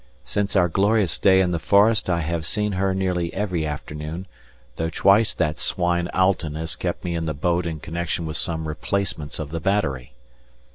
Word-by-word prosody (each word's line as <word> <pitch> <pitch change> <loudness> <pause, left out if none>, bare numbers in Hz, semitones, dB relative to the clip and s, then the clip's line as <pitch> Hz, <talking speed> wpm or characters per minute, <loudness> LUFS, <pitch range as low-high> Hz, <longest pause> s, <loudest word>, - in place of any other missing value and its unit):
Since 100 0 -1
our 90 -3 +5
glorious 100 0 +2
day 95 -1 +5
in 90 -1 +1
the 85 - -1
forest 105 +5 +4
I 85 -1 +1
have 85 0 -2
seen 105 +5 0
her 95 0 0
nearly 90 -3 -1
every 90 -6 -1
afternoon, 75 +4 -5 0.5
though 80 0 -1
twice 100 +6 +4
that 75 -2 0
swine 85 -1 0
Alten 90 -5 +1
has 80 0 -2
kept - - -3
me 85 - -2
in 85 -1 -2
the 75 - -2
boat 85 +4 0
in 80 -2 -4
connection 85 +1 -3
with 80 -1 -4
some 80 -2 -2
replacements 75 -2 -3
of 75 -2 -5
the 85 - -2
battery. 70 -9 -1
85 Hz, 185 wpm, -23 LUFS, 80-95 Hz, 0.5 s, our